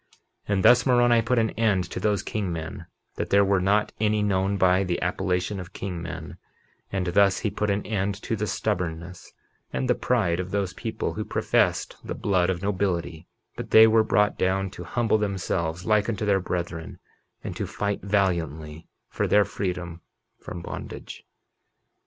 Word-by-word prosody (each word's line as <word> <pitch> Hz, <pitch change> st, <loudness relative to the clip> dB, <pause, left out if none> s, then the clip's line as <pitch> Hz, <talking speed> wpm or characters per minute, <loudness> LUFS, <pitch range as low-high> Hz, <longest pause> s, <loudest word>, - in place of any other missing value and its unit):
51:21 105 Hz, -, 0 dB
And 95 Hz, -, 0 dB
thus 125 Hz, 0 st, +6 dB
Moroni 120 Hz, -2 st, +5 dB
put 120 Hz, +2 st, 0 dB
an 110 Hz, -1 st, +3 dB
end 105 Hz, -5 st, +1 dB
to -, -, -4 dB
those 105 Hz, -2 st, 0 dB
king 100 Hz, -4 st, -3 dB
men, 80 Hz, +2 st, -6 dB, 0.3 s
that -, -, -3 dB
there 100 Hz, 0 st, +5 dB
were 95 Hz, -1 st, +2 dB
not 105 Hz, +3 st, +2 dB
any 105 Hz, 0 st, +2 dB
known 100 Hz, 0 st, +1 dB
by 95 Hz, 0 st, +4 dB
the 90 Hz, -2 st, -1 dB
appellation 90 Hz, +2 st, -1 dB
of 90 Hz, -1 st, -9 dB
king 90 Hz, -4 st, -5 dB
men; 85 Hz, -, -7 dB, 0.5 s
and 95 Hz, -2 st, -1 dB
thus 100 Hz, +2 st, +3 dB
he 105 Hz, -, -1 dB
put 105 Hz, +1 st, -1 dB
an 100 Hz, 0 st, -1 dB
end 100 Hz, -1 st, -1 dB
to 115 Hz, -, -1 dB
the 105 Hz, 0 st, -2 dB
stubbornness 85 Hz, -5 st, -3 dB, 0.4 s
and 130 Hz, -, -2 dB
the 125 Hz, -, +4 dB
pride 100 Hz, -10 st, 0 dB
of 90 Hz, 0 st, -3 dB
those 100 Hz, -1 st, -1 dB
people -, -, -3 dB
who -, -, -3 dB
professed -, -, 0 dB
the -, -, -5 dB
blood 95 Hz, -3 st, +1 dB
of 90 Hz, 0 st, -2 dB
nobility; 90 Hz, -5 st, -2 dB, 0.3 s
but -, -, -6 dB
they 110 Hz, 0 st, +9 dB
were 110 Hz, 0 st, +5 dB
brought 105 Hz, -1 st, +2 dB
down 95 Hz, +1 st, 0 dB
to 90 Hz, -, -8 dB
humble 115 Hz, +2 st, +1 dB
themselves 90 Hz, -4 st, -2 dB
like 105 Hz, +1 st, +2 dB
unto 110 Hz, -1 st, -2 dB
their 100 Hz, -2 st, +3 dB
brethren, 85 Hz, -3 st, -4 dB, 0.5 s
and -, -, -5 dB
to -, -, -3 dB
fight 100 Hz, -1 st, -2 dB
valiantly 85 Hz, -6 st, -1 dB, 0.2 s
for -, -, -2 dB
their 105 Hz, 0 st, +4 dB
freedom 90 Hz, -3 st, -4 dB, 0.4 s
from 85 Hz, -1 st, -8 dB
bondage. -, -, -8 dB
95 Hz, 175 wpm, -25 LUFS, 90-105 Hz, 0.5 s, they